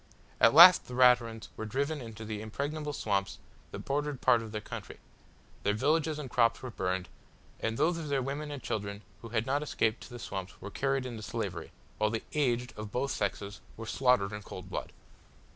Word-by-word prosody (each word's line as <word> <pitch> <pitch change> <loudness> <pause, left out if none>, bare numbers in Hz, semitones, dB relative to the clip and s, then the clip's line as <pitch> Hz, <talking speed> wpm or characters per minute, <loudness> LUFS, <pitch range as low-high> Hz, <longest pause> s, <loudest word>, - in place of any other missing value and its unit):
At 115 - +6
last 180 +2 +10
the 125 - -7
Raturans 125 -3 +4
were 110 - -5
driven 140 +6 -1
into 110 -2 -8
the 105 -1 -4
impregnable 145 +7 -3
swamps 100 -7 -1 0.3
that - - -8
bordered 145 -1 -1
part 120 - +4
of 110 -1 -8
their 105 - -3
country; 105 - -8 0.6
their 105 - +1
villages 155 +5 +1
and 150 -3 -5
crops 120 -1 +2
were 130 - -5
burned, 95 -2 -2 0.5
and 110 0 -2
those 165 +3 +2
of 155 -3 -5
their 140 -1 +1
women 145 +3 -4
and 145 -3 -6
children 100 -1 -4 0.2
who 115 - -8
had 110 0 0
not 140 +2 +1
escaped 115 -6 0
to - - -10
the 120 - -8
swamps 95 -6 -6
were 100 - -8
carried 135 +1 0
into 120 -3 -6
slavery, 100 -7 -4 0.3
while 105 0 +3
the 110 0 -3
aged 125 -4 0
of 105 -1 -7
both 135 +5 -1
sexes 100 0 -3 0.2
were 115 - -6
slaughtered 120 -4 +2
in 105 - -5
cold - - -9
blood. - - -4
120 Hz, 195 wpm, -31 LUFS, 105-140 Hz, 0.6 s, last